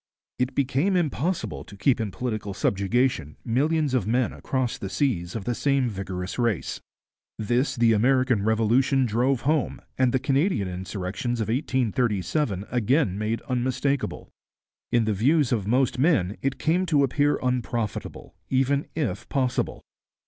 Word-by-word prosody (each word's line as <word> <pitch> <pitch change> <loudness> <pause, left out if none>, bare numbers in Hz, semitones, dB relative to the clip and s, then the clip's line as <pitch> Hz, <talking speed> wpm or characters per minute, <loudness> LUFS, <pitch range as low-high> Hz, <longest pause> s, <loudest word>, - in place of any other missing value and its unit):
It 125 +1 -1
became 140 +8 +1
impossible 160 - -1
to 100 - -13
keep 120 +4 +2
in 110 - -2
political 105 -2 -4
subjection 100 - 0
millions 145 +4 +1
of 120 -6 +1
men 120 +2 +1
across 130 -3 -2
the 95 - -5
seas 95 -6 -1
of 110 - -3
the 120 - -1
same 135 0 +1
vigorous 95 -1 -5
race. 115 -7 -1 0.6
This 120 +5 0
the 115 -1 +4
American 125 0 +3
Revolution 115 +5 +3
drove 120 +3 +1
home 150 +1 0 0.2
and 130 -1 +4
the 130 - +2
Canadian 135 - +1
insurrections 95 +6 -4
of 110 - -2
1837 115 - 0
again 125 - +2
made 110 +2 -2
unmistakable. 130 +2 -1 0.6
In 120 -2 +3
the 110 - +1
views 140 - +2
of 105 -5 0
most 125 +2 +2
men 115 - +2
it 135 0 -1
came 180 +4 +1
to 150 -4 +3
appear 145 +2 +2
unprofitable, 120 -4 -3 0.2
even 135 +2 +1
if 120 - -3
possible. 130 -2 -1
125 Hz, 140 wpm, -25 LUFS, 105-135 Hz, 0.6 s, the